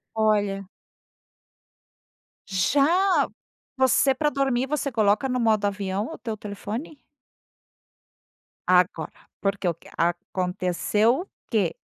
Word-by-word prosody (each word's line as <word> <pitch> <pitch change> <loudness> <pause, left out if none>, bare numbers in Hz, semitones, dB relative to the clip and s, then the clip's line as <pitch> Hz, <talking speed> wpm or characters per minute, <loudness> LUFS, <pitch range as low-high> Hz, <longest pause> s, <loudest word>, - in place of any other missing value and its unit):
Olha. 205 -3 +1 1.8
Já. 290 - +3 0.5
Você, 265 +1 +4
pra 295 +2 +1
dormir, 270 -2 0
você 285 -1 -1
coloca 215 +2 +2
no 250 -1 -1
modo 215 -3 +2
avião 200 +1 -1
o - - -8
teu 220 -3 -5
telefone? 215 +8 -6 1.6
Agora, 180 -3 +1
porque 195 -2 -1
o 170 - +2
que 165 - -18
Aconteceu 185 - 0
o 390 - -9 0.2
que? 200 -7 +2
215 Hz, 100 wpm, -25 LUFS, 195-265 Hz, 1.8 s, Você